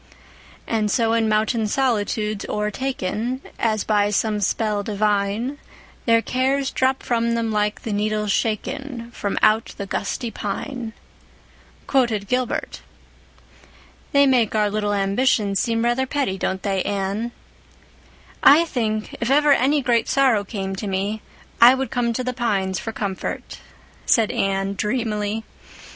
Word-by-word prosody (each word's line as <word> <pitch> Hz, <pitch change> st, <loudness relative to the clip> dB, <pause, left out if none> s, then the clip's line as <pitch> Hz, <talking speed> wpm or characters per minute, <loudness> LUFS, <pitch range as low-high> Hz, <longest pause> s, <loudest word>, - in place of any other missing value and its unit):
"'And 215 Hz, -2 st, 0 dB
so 225 Hz, +1 st, +2 dB
in 225 Hz, -1 st, +2 dB
mountain 215 Hz, +1 st, +1 dB
solitudes 215 Hz, -4 st, 0 dB
o'ertaken 225 Hz, +2 st, -2 dB, 0.2 s
As 215 Hz, -2 st, +1 dB
by 205 Hz, -1 st, +2 dB
some 210 Hz, +1 st, 0 dB
spell 210 Hz, +1 st, 0 dB
divine, 210 Hz, +5 st, -1 dB, 0.5 s
Their 230 Hz, 0 st, +4 dB
cares 265 Hz, +2 st, 0 dB
drop 260 Hz, 0 st, +1 dB
from 235 Hz, -1 st, 0 dB
them 230 Hz, -1 st, -1 dB
like 210 Hz, 0 st, -1 dB
the 220 Hz, -, -3 dB
needles 210 Hz, 0 st, 0 dB
shaken 235 Hz, +3 st, -2 dB
From 200 Hz, -4 st, -3 dB
out 215 Hz, +1 st, +3 dB
the 200 Hz, -, -4 dB
gusty 210 Hz, +4 st, -3 dB
pine,'" 225 Hz, +3 st, -5 dB, 0.9 s
quoted 235 Hz, -7 st, +1 dB
Gilbert. 250 Hz, +1 st, -2 dB, 1.3 s
"They 280 Hz, 0 st, +5 dB
make 245 Hz, -6 st, +2 dB
our 210 Hz, -1 st, +2 dB
little 210 Hz, 0 st, 0 dB
ambitions 200 Hz, 0 st, +1 dB
seem 230 Hz, -1 st, 0 dB
rather 250 Hz, +2 st, +1 dB
petty, 270 Hz, -8 st, -1 dB
don't 190 Hz, +1 st, -2 dB
they, 195 Hz, -2 st, 0 dB
Anne?" 200 Hz, +4 st, -2 dB, 1.1 s
"I 310 Hz, +5 st, +7 dB
think, 215 Hz, -8 st, -2 dB
if 235 Hz, -, 0 dB
ever 290 Hz, +1 st, +5 dB
any 280 Hz, +2 st, +2 dB
great 235 Hz, -2 st, +1 dB
sorrow 260 Hz, -7 st, +3 dB
came 195 Hz, -2 st, -4 dB
to 210 Hz, -, -4 dB
me, 200 Hz, +3 st, -2 dB, 0.4 s
I 245 Hz, +2 st, +9 dB
would 265 Hz, 0 st, -3 dB
come 245 Hz, -2 st, 0 dB
to 255 Hz, -, -2 dB
the 255 Hz, 0 st, -2 dB
pines 195 Hz, -6 st, -1 dB
for 225 Hz, -, -5 dB
comfort," 200 Hz, -4 st, -4 dB, 0.5 s
said 225 Hz, -3 st, +3 dB
Anne 195 Hz, 0 st, 0 dB
dreamily. 215 Hz, -1 st, -2 dB
220 Hz, 135 wpm, -22 LUFS, 205-250 Hz, 1.3 s, I